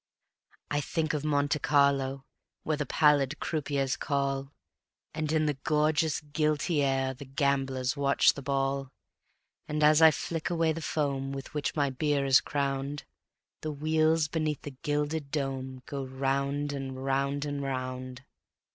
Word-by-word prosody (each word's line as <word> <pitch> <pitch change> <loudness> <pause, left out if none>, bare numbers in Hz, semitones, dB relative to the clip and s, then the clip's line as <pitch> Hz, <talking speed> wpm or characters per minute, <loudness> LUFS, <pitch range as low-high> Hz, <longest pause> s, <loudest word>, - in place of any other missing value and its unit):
I 145 0 +1
think 155 +3 -1
of 150 -1 -2
Monte 145 0 +1
Carlo, 140 -2 +2 0.4
where 155 - 0
The 150 -2 -3
pallid 150 -1 +3
croupiers 140 -4 -1
call, 140 -1 -1 0.6
And 155 -1 -2
in 155 -1 +2
the 150 - +1
gorgeous, 155 0 +2
guilty 150 +1 0
air 135 -1 +1
The 135 +2 -10
gamblers 135 -2 0
watch 140 -1 +4
the 140 - -7
ball; 135 0 -1 0.8
And 150 0 -1
as 150 +1 +6
I 160 - +10
flick 160 +1 -3
away 165 -2 +2
the 165 - -6
foam 140 -3 -1
With 135 0 -7
which 150 -1 -2
my 140 -3 +1
beer 145 +1 0
is 130 -3 +6
crowned, 140 +2 -2 0.6
The 155 - -3
wheels 155 +1 +2
beneath 155 -2 -2
the 145 - -6
gilded 150 0 -1
dome 135 -3 -3
Go 140 -1 -4
round 140 +2 -1
and 135 -1 -5
round 140 +1 0
and 145 -1 -3
round. 130 -1 -4
140 Hz, 145 wpm, -29 LUFS, 135-150 Hz, 0.8 s, I